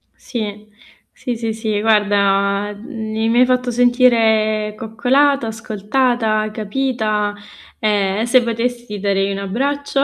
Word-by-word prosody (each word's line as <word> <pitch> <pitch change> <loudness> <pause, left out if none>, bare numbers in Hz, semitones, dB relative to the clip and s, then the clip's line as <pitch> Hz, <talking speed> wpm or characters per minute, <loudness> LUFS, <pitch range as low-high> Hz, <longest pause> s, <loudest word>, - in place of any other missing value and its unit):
Sì, 215 -3 -6 0.4
sì, 245 -3 -5
sì, 225 -1 -3
sì, 215 -1 -2
guarda 205 -1 +2
mi 220 -1 -4
mi 235 +1 +3
hai 250 - +6
fatto 250 0 0
sentire 225 -3 +3
coccolata, 245 +4 +1
ascoltata, 220 0 -1
capita 215 -2 -1 0.4
e 205 -1 0
se 245 +1 +4
potessi 235 -2 -3
darei 195 0 0
un 195 - -3
abbraccio 275 +7 -1
220 Hz, 115 wpm, -18 LUFS, 210-245 Hz, 0.4 s, hai